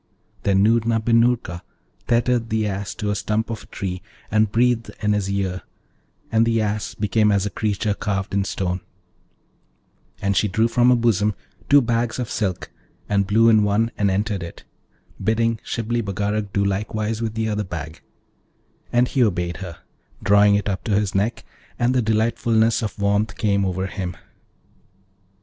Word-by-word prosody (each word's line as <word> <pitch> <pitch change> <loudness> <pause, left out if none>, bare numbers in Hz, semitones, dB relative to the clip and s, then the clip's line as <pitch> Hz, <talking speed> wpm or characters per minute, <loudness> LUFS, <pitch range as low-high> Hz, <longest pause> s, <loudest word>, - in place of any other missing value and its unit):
Then 95 -1 +3
Noorna 115 +1 +3
bin 115 +1 +3
Noorka 115 -8 0 0.5
tethered 120 -1 +1
the 110 0 0
Ass 100 -1 -3
to 105 -2 -2
a - - -1
stump 110 +3 -1
of 110 - -5
a - - -14
tree 90 -2 -5 0.3
and 110 -1 +3
breathed 120 0 +2
in 105 0 +3
his 100 -2 -1
ear, 95 -2 -2 0.7
and 110 0 +4
the 115 0 +2
Ass 105 -1 -2
became 105 +1 +2
as 100 -1 +2
a 105 - -3
creature 105 -1 -1
carved 100 -2 -3
in 100 0 +2
stone; 90 -1 -2 1.4
and 100 0 0
she 105 - +3
drew 110 +4 +2
from 120 +1 +3
her 125 - +6
bosom 105 -3 +2 0.3
two 140 -1 +6
bags 115 0 0
of 125 -3 -4
silk, 95 -5 -2 0.4
and 100 -1 +1
blew 110 +3 +4
in 110 -2 +6
one 105 +3 +1
and 100 -1 +1
entered 100 +1 -1
it, 85 -1 -8 0.6
bidding 115 0 +1
Shibli 115 +1 -2
Bagarag 105 0 -2
do 100 0 +1
likewise 110 +3 -2
with 110 -1 -3
the 110 0 -1
other 105 -1 -1
bag; 80 -4 -7 0.9
and 120 +1 +3
he 130 -1 +2
obeyed 85 -5 0
her, 90 -4 -8 0.4
drawing 100 0 +5
it 100 0 -1
up 95 -2 -2
to 105 - +1
his 105 -1 0
neck, 105 +4 -1 0.3
and 120 +1 +2
the 130 - +2
delightfulness 110 0 +2
of 110 - -4
warmth 100 +1 0
came 100 -2 +1
over 95 0 -1
him. 95 -3 -4
105 Hz, 170 wpm, -22 LUFS, 100-115 Hz, 1.4 s, her